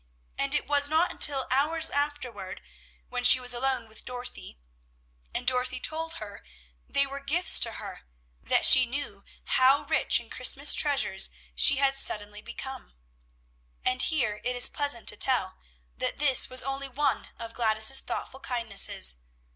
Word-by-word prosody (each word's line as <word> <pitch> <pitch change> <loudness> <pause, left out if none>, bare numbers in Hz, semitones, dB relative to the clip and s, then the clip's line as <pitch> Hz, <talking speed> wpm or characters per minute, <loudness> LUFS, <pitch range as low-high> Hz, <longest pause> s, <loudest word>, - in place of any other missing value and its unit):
And 275 +1 -1
it 295 - -1
was 285 0 0
not 320 +3 +1
until 275 -2 +4
hours 315 +5 0
afterward, 280 -9 -5 0.5
when - - -5
she 255 - +7
was 250 -1 +1
alone 250 -1 -1
with 220 0 -9
Dorothy, 250 - -9 0.7
and 250 - -4
Dorothy 255 0 -1
told 325 +4 -4
her 205 -1 -10 0.5
they 280 - +1
were 275 0 -8
gifts 305 +6 +4
to - - 0
her, - - -9 0.4
that - - +1
she 255 -1 +7
knew 235 -6 -6 0.2
how 265 +2 +2
rich - - +1
in - - -14
Christmas - - +3
treasures 285 -2 0 0.2
she 280 - +5
had 275 0 +1
suddenly 210 -5 0
become. 265 - -10 0.9
And 255 0 +1
here 240 -10 0
it 250 0 -2
is 245 - +3
pleasant 285 -6 -2
to 210 - -5
tell, 195 -8 0 0.4
that - - -3
this 275 -3 +2
was 255 0 +5
only 275 +1 -5
one 280 +2 -2
of 230 0 -8
Gladys's 220 +2 0
thoughtful 265 - -7
kindnesses. 210 - -2
260 Hz, 155 wpm, -26 LUFS, 235-280 Hz, 0.9 s, she